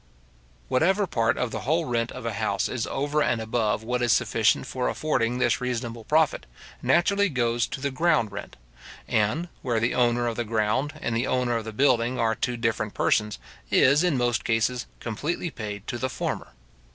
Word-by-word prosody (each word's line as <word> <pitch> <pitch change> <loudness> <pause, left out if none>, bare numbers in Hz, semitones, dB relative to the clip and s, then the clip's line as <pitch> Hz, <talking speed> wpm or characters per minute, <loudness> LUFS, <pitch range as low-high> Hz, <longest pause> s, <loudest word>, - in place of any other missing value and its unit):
Whatever 190 +9 +2
part 115 -8 +1
of 125 -2 -1
the - - -3
whole 160 +4 0
rent 115 -3 -1
of - - -8
a - - -2
house - - 0
is - - -3
over 145 +2 0
and 120 -4 +1
above 110 -1 -1
what 125 +2 -1
is 120 -1 +2
sufficient 110 -2 +2
for 125 -1 -2
affording 125 -6 0
this 120 -1 +1
reasonable 120 -2 -3
profit, 155 -1 +2 0.3
naturally 200 +3 +3
goes 120 -3 0
to - - -6
the 140 +1 -2
ground 130 -7 +2
rent; - - -8 0.5
and, 110 +12 +1
where 120 -3 0
the 115 +2 +1
owner 120 -1 +2
of 115 -1 -2
the 120 - 0
ground 115 +6 0
and 115 - -1
the 120 +3 0
owner 125 -2 +1
of 115 -1 -2
the 110 - -5
building 125 0 +2
are 110 -1 +2
two 120 +2 -2
different 115 -2 -1
persons, 105 -1 +1 0.3
is, 140 +5 +5
in 175 -6 +2
most 120 -1 +1
cases, 115 +2 0
completely 150 - -3
paid 105 -4 -6
to 120 - -4
the 130 - -1
former. 65 - -4
120 Hz, 190 wpm, -26 LUFS, 115-135 Hz, 0.5 s, is